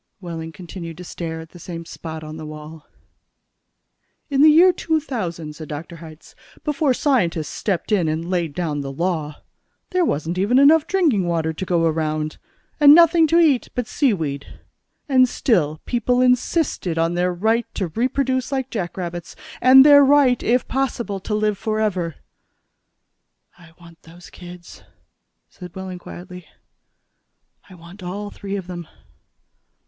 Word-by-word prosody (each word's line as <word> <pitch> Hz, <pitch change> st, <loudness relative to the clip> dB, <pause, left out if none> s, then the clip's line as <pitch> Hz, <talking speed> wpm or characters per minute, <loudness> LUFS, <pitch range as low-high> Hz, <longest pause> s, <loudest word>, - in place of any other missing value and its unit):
Wehling 165 Hz, -3 st, -7 dB
continued 170 Hz, -1 st, -9 dB
to 180 Hz, -, -9 dB
stare 165 Hz, -2 st, -6 dB
at 160 Hz, -, -12 dB
the 175 Hz, -, -14 dB
same 170 Hz, -1 st, -8 dB
spot 160 Hz, -1 st, -8 dB
on 155 Hz, 0 st, -8 dB
the 155 Hz, -, -8 dB
wall. 155 Hz, 0 st, -10 dB, 1.4 s
"In 275 Hz, 0 st, +2 dB
the 310 Hz, -, +8 dB
year 350 Hz, +4 st, +6 dB
2000," 215 Hz, -, -3 dB
said 155 Hz, 0 st, -9 dB
Dr. 160 Hz, +4 st, -7 dB
Hitz, 160 Hz, -1 st, -13 dB, 0.3 s
"before 295 Hz, -3 st, +1 dB
scientists 175 Hz, -, 0 dB
stepped 195 Hz, 0 st, -3 dB
in 185 Hz, -6 st, +2 dB
and 160 Hz, +2 st, -2 dB
laid 175 Hz, -5 st, -2 dB
down 155 Hz, -5 st, -2 dB
the 135 Hz, -1 st, -5 dB
law, 155 Hz, -1 st, -3 dB, 0.5 s
there 365 Hz, -1 st, +2 dB
wasn't 165 Hz, -, -2 dB
even 210 Hz, +7 st, +2 dB
enough 300 Hz, +3 st, +5 dB
drinking 300 Hz, -, +1 dB
water 160 Hz, -2 st, -1 dB
to 190 Hz, -, -5 dB
go 175 Hz, -2 st, +1 dB
around, 155 Hz, -1 st, -2 dB, 0.4 s
and 290 Hz, 0 st, +9 dB
nothing 335 Hz, -1 st, +5 dB
to 330 Hz, -, +2 dB
eat 305 Hz, -7 st, +3 dB
but 245 Hz, -, -1 dB
sea 275 Hz, +2 st, +1 dB
weed 145 Hz, -7 st, -5 dB, 0.5 s
and 255 Hz, -3 st, +4 dB
still 155 Hz, -, 0 dB
people 245 Hz, 0 st, 0 dB
insisted 250 Hz, -, +1 dB
on 165 Hz, +1 st, +1 dB
their 180 Hz, +1 st, 0 dB
right 220 Hz, +6 st, 0 dB
to 185 Hz, -4 st, -2 dB
reproduce 260 Hz, -, -1 dB
like 265 Hz, -1 st, -2 dB
jackrabbits. 175 Hz, -4 st, -5 dB, 0.3 s
And 265 Hz, +2 st, +8 dB
their 285 Hz, -1 st, +8 dB
right, 275 Hz, -3 st, +4 dB
if 245 Hz, +2 st, +1 dB
possible, 240 Hz, -6 st, -2 dB
to 210 Hz, +3 st, -3 dB
live 210 Hz, -2 st, 0 dB
forever." 210 Hz, -7 st, -1 dB, 1.4 s
"I 170 Hz, -2 st, -18 dB
want 170 Hz, -1 st, -17 dB
those 175 Hz, +2 st, -15 dB
kids," 175 Hz, -1 st, -12 dB, 0.7 s
said 180 Hz, -3 st, -12 dB
Wehling 190 Hz, -1 st, -7 dB
quietly. 180 Hz, 0 st, -11 dB, 1.2 s
"I 185 Hz, -, -13 dB
want 175 Hz, +3 st, -14 dB
all 200 Hz, +3 st, -6 dB
three 200 Hz, 0 st, -6 dB
of 195 Hz, -3 st, -5 dB
them." 175 Hz, -2 st, -8 dB
180 Hz, 150 wpm, -21 LUFS, 165-250 Hz, 1.4 s, and